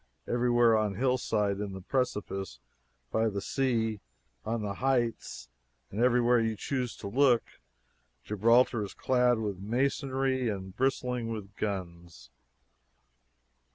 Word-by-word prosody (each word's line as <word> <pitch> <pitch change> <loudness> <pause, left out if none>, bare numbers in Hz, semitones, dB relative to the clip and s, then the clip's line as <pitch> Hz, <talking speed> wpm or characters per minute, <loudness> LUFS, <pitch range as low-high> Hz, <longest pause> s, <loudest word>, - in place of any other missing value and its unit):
Everywhere 120 -1 +3
on 105 -2 0
hillside, 110 -5 0
in 100 -2 -4
the 95 - -7
precipice, 95 - -2 0.5
by 110 0 +2
the 100 -1 -3
sea, 115 -3 0 0.4
on 115 -1 -2
the 100 -1 -2
heights 120 - -1 0.4
everywhere 120 +2 +3
you 110 -1 0
choose 125 +1 -3
to - - -7
look, 125 +2 +4 0.8
Gibraltar 115 +3 +3
is 100 - -7
clad 125 -2 +2
with 105 -4 -3
masonry 130 +3 0
and 95 -2 -5
bristling 125 -3 0
with 105 -3 -6
guns. 85 - -5
115 Hz, 115 wpm, -29 LUFS, 100-125 Hz, 0.8 s, look